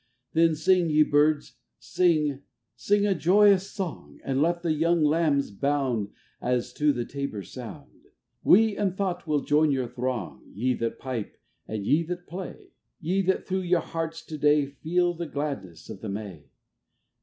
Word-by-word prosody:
443 165 +1 +5
Then 160 - -1
sing, 175 +2 +3
ye 155 - +7
Birds, 150 0 +2 0.2
sing, 155 -6 +1 0.3
sing 205 0 +1
a 200 - +3
joyous 195 +3 +4
song! 190 -5 -6
And 135 0 0
let 170 +2 +1
the 165 -2 +1
young 165 +1 +2
Lambs 150 -4 +2
bound 130 -3 -1 0.3
As 125 0 -1
to 150 +2 +2
the 120 -3 -3
tabor's 140 -9 -5
sound! - - -10 0.4
We 220 +2 +5
in 195 -3 -1
thought 185 -3 -3
will 150 -2 +1
join 150 +1 +3
your 135 -3 0
throng, 120 - -4
Ye 125 +5 +1
that 115 -1 -3
pipe 125 -5 -5 0.3
and 105 -2 -4
ye 150 +9 +3
that 175 +1 -5
play, 185 +1 -8 0.3
Ye 185 +3 0
that 190 - +1
through 190 0 -1
your 175 -1 +2
hearts 165 0 -5
to 155 -1 -7
day 150 0 +4
Feel 175 +5 0
the 170 0 -5
gladness 140 - -5
of - - -9
the 110 - -5
May 100 -7 -6
150 Hz, 165 wpm, -26 LUFS, 130-175 Hz, 0.4 s, ye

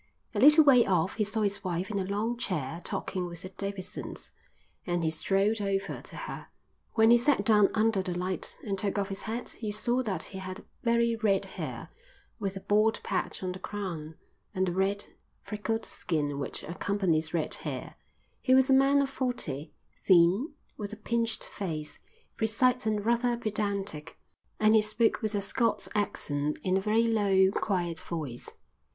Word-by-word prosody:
A - - -1
little 300 +3 +8
way 260 -5 +7
off 185 -2 +1
he 215 - +2
saw 215 +2 -1
his 200 -1 0
wife 185 +2 -2
in 200 - -1
a - - 0
long 205 +5 -1
chair 170 - -3
talking 185 -2 -3
with 170 0 -9
the 185 - -6
Davidsons, 195 -1 -5 0.6
and 175 -1 0
he 160 - +1
strolled 195 +6 +1
over 195 -1 -2
to - - -12
her. - - -6 0.5
When 225 0 +6
he 240 - +7
sat 240 -5 +2
down 210 -2 +5
under 220 -2 +2
the 180 -2 -3
light 185 +1 -3
and 195 -2 -2
took 200 0 -1
off 200 0 -1
his 195 0 -4
hat 230 +2 -5
you 215 -2 -2
saw 240 +4 +1
that 195 -9 -2
he 190 - -7
had 185 +1 -7 0.2
very 235 0 +2
red 205 -3 +2
hair, - - -6 0.5
with 195 -2 -3
a - - -7
bald 215 +3 +2
patch 185 0 -2
on 185 - -1
the 185 - -7
crown, 170 -7 -5 0.4
and 190 0 +2
the - - 0
red, 195 +2 0 0.4
freckled 225 +2 -3
skin 145 -4 -2
which 140 - -4
accompanies 170 -2 0
red 165 -3 -1
hair; - - -5 0.5
he 260 - +4
was 265 0 +5
a - - +7
man 275 +1 +5
of 275 - -2
forty, 165 - -3 0.3
thin, 190 - +4 0.2
with 205 -1 -5
a 215 - -7
pinched 230 +1 0
face, 155 -6 -5 0.4
precise 245 +2 +2
and 210 -1 0
rather 235 +1 +2
pedantic; 200 -8 -2 0.4
and 215 0 +5
he 220 - +6
spoke 215 +3 +1
with 215 -1 -1
a 200 - +1
Scots 230 +4 +1
accent 150 -8 -1
in 185 0 +1
a 190 - +2
very 215 +3 +2
low, 200 -4 +3
quiet 175 -5 -1
voice. 150 -8 -5
200 Hz, 180 wpm, -29 LUFS, 185-225 Hz, 0.6 s, little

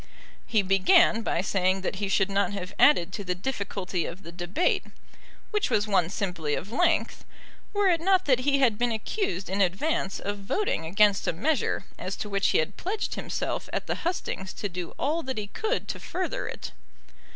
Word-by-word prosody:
He 215 -3 +2
began 195 +4 +5
by 175 - 0
saying 190 0 +1
that 190 +1 -3
he 200 0 -2
should 195 0 +2
not 200 +1 +1
have 190 0 -5
added 185 - +5
to 205 - -4
the 180 -1 -2
difficulty 195 -4 -3
of 185 +4 -8
the 170 - -9
debate, 175 - 0 0.7
which 420 -2 +1
was 215 -3 +2
one 190 -5 +2
simply 180 -7 -2
of 200 - -6
length, 340 +7 +1 0.5
were 410 -1 +2
it 340 -3 +3
not 375 +1 +3
that 255 -3 +4
he 275 +2 +2
had 240 -6 +3
been 240 0 +2
accused 220 - -2
in 195 +2 -1
advance 195 - 0
of 205 0 -4
voting 195 - -1
against 200 +3 +3
a - - +2
measure 270 - 0
as 185 - -3
to 210 - -5
which 200 -1 +1
he - - +3
had 155 - -1
pledged 410 +4 -2
himself - - -3
at - - -2
the - - -2
hustings 325 - -3
to 205 - -3
do 180 -2 -6
all 310 +4 0
that 260 -5 -4
he 210 - -2
could 430 - -2
to - - -4
further 375 +8 -3
it. - - -6
205 Hz, 195 wpm, -27 LUFS, 185-280 Hz, 0.7 s, began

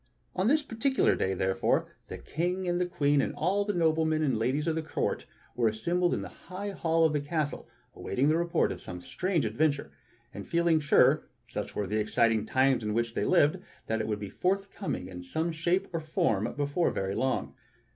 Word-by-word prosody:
On 185 +3 +1
this 300 +4 +3
particular 265 +1 +1
day, 95 0 0
therefore, 95 +1 +1 0.2
the - - -6
King 180 +4 -2
and 175 0 +1
the 180 - +1
Queen 145 -5 +2
and - - -2
all 195 +5 +1
the 205 - -1
noblemen 160 -2 +2
and 135 -5 +1
ladies 130 +7 0
of 165 - +1
the 160 - -1
court 155 - -2 0.3
were 120 -2 +2
assembled 175 +12 +1
in - - -3
the - - -10
high 200 +2 -4
hall 165 -3 +2
of 155 - +2
the 150 - 0
castle 150 0 -3 0.2
awaiting 130 +7 -1
the 155 - +4
report 170 0 +1
of - - -6
some 90 - -7
strange 175 - -1
adventure, 145 +6 0 0.4
and - - -8
feeling 170 -1 +3
sure, 145 -2 +4 0.2
such - - -5
were 105 - -1
the 105 +3 -1
exciting 110 0 +2
times 130 -1 +3
in 105 0 -2
which 115 0 0
they - - -1
lived, 175 0 +3 0.3
that 110 0 -1
it - - -3
would 105 -1 -1
be 100 - -5
forthcoming 195 - -2
in 90 -1 -8
some 160 - -2
shape 170 +3 0
or 165 - 0
form 155 - 0
before 145 +4 +1
very 95 0 -2
long. 130 +4 -1
155 Hz, 200 wpm, -29 LUFS, 115-175 Hz, 0.4 s, the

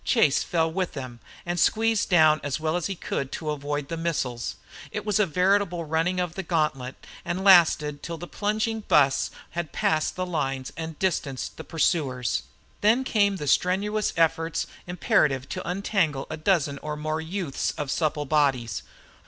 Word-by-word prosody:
Chase 155 - +3
fell 165 -2 0
with 185 +1 -2
them 130 -4 -7 0.3
and 175 0 -2
squeezed 225 +2 +2
down 155 -4 +5
as 145 0 -2
well 155 +1 -1
as 175 - -1
he 195 - -3
could 140 -5 -3
to 155 -1 -3
avoid 145 0 -3
the 165 - -4
missiles. 135 -8 -2 0.3
It - - -5
was 210 -1 +1
a 210 - +3
veritable 180 0 +1
running 165 +4 0
of 175 -2 -1
the 190 - -4
gantlet, 150 -7 -1 0.3
and 175 +3 -3
lasted 155 -6 +5
till 170 -1 -5
the 175 - -7
plunging 215 +4 -1
bus 140 -9 +3 0.2
had 170 -2 -4
passed 155 -1 0
the 185 - -2
lines 135 -6 -2
and 160 0 -6
distanced 155 -8 -2
the - - -8
pursuers. 145 -7 0 0.4
Then 225 +5 +4
came 205 -5 +2
the 150 - -5
strenuous 200 +8 +1
efforts 165 0 +1 0.2
imperative 145 -6 +1
to - - -4
untangle 180 -7 0
a - - -2
dozen 155 -4 +1
or 150 +1 -4
more 155 +1 -2
youths 165 -3 -2
of 145 -3 -3
supple 150 -2 0
bodies. 135 - +1
160 Hz, 170 wpm, -26 LUFS, 145-185 Hz, 0.4 s, down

